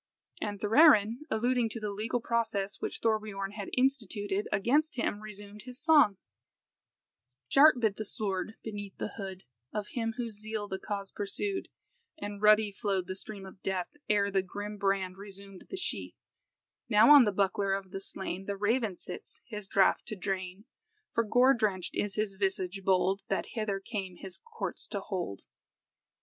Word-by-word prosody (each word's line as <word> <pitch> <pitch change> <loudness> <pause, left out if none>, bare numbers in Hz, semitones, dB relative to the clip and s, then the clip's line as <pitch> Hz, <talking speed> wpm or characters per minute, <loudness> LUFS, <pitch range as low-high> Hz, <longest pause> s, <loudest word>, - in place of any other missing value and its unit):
And 205 -1 -3
Thorarin, 225 -1 +6
alluding 240 +1 +1
to 230 - -5
the 210 -1 -3
legal 220 +4 -1
process 220 -4 -1
which - - -4
Thorbiorn 210 -3 0
had 205 -2 -6
instituted 215 -6 0
against 260 +10 +2
him, 235 -4 -1
resumed 210 -1 -10
his 250 0 -8
song 295 - +5 1.3
"Sharp 300 +2 +7
bit 220 -4 +1
the 215 - -2
sword 205 -1 -3
beneath 205 -3 -6
the - - -3
hood 190 -2 -6 0.3
Of 210 -1 -3
him 225 -2 -2
whose 230 -4 -4
zeal 215 -1 -4
the 190 -1 -4
cause 200 -2 -4
pursued, 380 - -3 0.5
And 205 -8 -6
ruddy 210 0 +6
flowed 195 -2 -1
the 185 - -4
stream 200 0 -7
of 190 0 -12
death, 185 -2 -2 0.2
Ere 200 -1 +3
the 195 -1 +3
grim 205 +3 -6
brand 195 -2 0
resumed 195 -1 -10
the 380 - -5
sheath; 370 - -3 0.7
Now 225 +5 +8
on 280 -4 +9
the 210 - +2
buckler 195 0 +1
of 195 -1 -6
the 195 -1 -4
slain 190 -1 -3
The 200 -1 -2
raven 220 0 +1
sits, - - -7
his 210 -4 -6
draught 195 0 +3
to 215 - -3
drain, 190 +1 -4 0.5
For 230 - +2
gore 245 +5 +5
drenched 205 -7 -1
is 205 -2 -1
his 210 -2 -1
visage 190 0 -1
bold, 190 +1 +2
That - - -1
hither 215 -4 -1
came 195 -3 -5
his 185 +1 -8
courts 465 -1 -5
to 200 - -3
hold." 185 - -4
205 Hz, 165 wpm, -30 LUFS, 195-225 Hz, 1.3 s, on